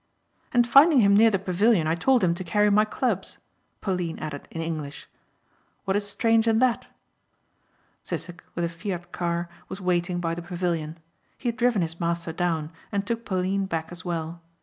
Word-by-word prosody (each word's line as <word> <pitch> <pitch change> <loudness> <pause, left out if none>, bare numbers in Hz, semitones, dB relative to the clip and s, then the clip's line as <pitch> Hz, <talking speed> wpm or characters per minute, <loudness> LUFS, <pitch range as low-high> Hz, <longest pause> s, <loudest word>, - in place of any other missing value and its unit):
"And 240 -1 +4
finding 275 +3 +7
him 200 -1 +5
near 225 +2 +7
the 200 - +1
pavilion 195 0 +2
I 160 - +1
told 245 +8 +3
him 170 -2 +3
to 180 +2 -5
carry 210 +3 +2
my 210 +1 +5
clubs," 215 -3 -2 0.4
Pauline 180 -4 -2
added 145 -2 -6
in 165 - -7
English. 155 -3 -5 0.8
"What 195 - 0
is 205 0 0
strange 225 +2 +2
in 225 -1 +4
that?" 250 0 +2 1.1
Sissek 175 0 -5
with 175 - 0
a - - -2
Fiat 175 +1 -5
car 170 0 -2 0.2
was 190 - -6
waiting 180 -1 0
by 165 -1 -1
the 175 - -5
pavilion. 170 -3 -3 0.4
He 245 - -2
had 235 - -4
driven 240 -6 +2
his 165 0 -5
master 170 -1 -1
down 165 -3 -1 0.2
and 200 -1 -1
took 230 +1 -3
Pauline 190 0 0
back 165 -2 -3
as 175 - -8
well. 170 -1 -4
180 Hz, 180 wpm, -25 LUFS, 170-210 Hz, 1.1 s, finding